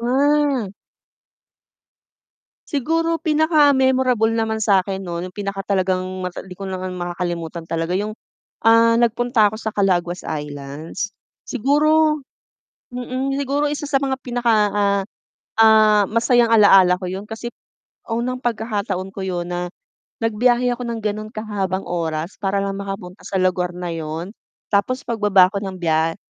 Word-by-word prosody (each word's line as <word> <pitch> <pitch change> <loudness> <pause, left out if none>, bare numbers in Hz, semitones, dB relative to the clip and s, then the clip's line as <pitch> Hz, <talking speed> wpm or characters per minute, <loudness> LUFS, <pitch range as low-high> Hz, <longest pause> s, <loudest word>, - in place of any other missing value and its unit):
Mm. 270 -3 +1 1.9
Siguro 330 +4 0
pinaka-memorable 265 - +3
naman 220 -1 0
sa 200 -3 +3
akin 190 0 -5
no, 170 -1 -4
nung 180 0 -8
pinakatalagang 195 -2 -1 0.2
mata 180 -1 -5
hindi 180 -2 -11
ko 195 - -7 0.3
makakalimutan 175 -2 -4
talaga 165 +1 -2
yung, 210 +3 -2 0.5
ah, 230 0 +6
nagpunta 235 -2 +2
ako 220 - -7
sa 220 - -3
Calaguas 180 -4 0
Islands, 150 +6 -5 0.3
siguro 300 +3 +2 0.7
mm, 255 +2 -2
siguro 280 +1 0
isa 295 0 -3
sa 285 -2 +1
mga 270 -1 -1
pinaka, 240 -2 +1 0.2
ah, 200 -1 +1 0.6
ah, 215 -2 +6
masayang 230 +2 +2
alaala 195 -4 +6
ko 185 - -4
'yon 190 +2 -5
kasi 225 +2 -6 0.6
unang 250 +2 -2
pagkakataon 210 -5 -2
ko 195 - -5
yun 175 -2 -3
na 175 0 -2 0.6
nagbiyahe 240 +2 +2
ako 250 - -7
ng 230 -1 -3
ganun 215 0 -2
kahabang 200 -4 -3
oras 165 0 -3
para 195 0 0
lang 195 0 -3
makapunta 195 -2 -7
sa - - -5
lugar 180 -1 +1
na 180 -1 -4
'yon. 165 +3 -5 0.4
Tapos 255 +7 +1
pagbaba 205 -5 +4
'ko 200 - -2
ng 190 -1 -5
bya 165 -1 +1
210 Hz, 130 wpm, -21 LUFS, 185-245 Hz, 1.9 s, ah